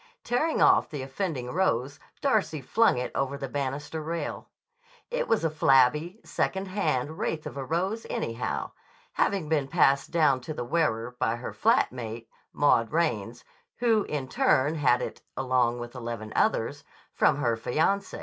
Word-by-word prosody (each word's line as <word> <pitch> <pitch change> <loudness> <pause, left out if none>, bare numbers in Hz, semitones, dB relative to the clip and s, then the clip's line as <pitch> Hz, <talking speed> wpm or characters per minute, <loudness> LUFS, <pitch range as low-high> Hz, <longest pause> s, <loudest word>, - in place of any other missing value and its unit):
Tearing 305 +7 +1
off - - +5
the 145 -4 -5
offending 135 -3 -3
rose 140 -7 0 0.2
Darcy 215 - +1
flung 215 - +2
it 125 - -3
over 135 +1 -1
the 135 - -4
banister 145 +3 -3
rail. 165 +2 -4 0.6
It - - -1
was 220 -6 +1
a 165 - +2
flabby, 150 - +3
second 190 0 -2
hand 155 -6 -1
wraith 155 -1 -2
of - - -6
a 140 - -4
rose, 185 - -2
anyhow, 115 +1 -3 0.4
having 195 -6 0
been 150 -3 +1
passed 140 -3 +3
down 150 -6 +3
to 155 +5 -6
the 120 - -4
wearer 120 -5 0
by 115 - +1
her 120 - -6
flat 230 +5 +3
mate, 115 -2 -7 0.2
Maud 115 -5 +3
Raines, 120 -8 -1 0.3
who 230 -3 +3
in 140 -3 -3
turn 130 +3 +2
had 125 -5 +2
it, - - -6 0.2
along 125 -2 +1
with 120 0 -7
eleven 115 -3 -6
others, - - +1 0.3
from - - +3
her 120 -5 +1
fiancé. 160 - 0
140 Hz, 160 wpm, -27 LUFS, 125-170 Hz, 0.6 s, off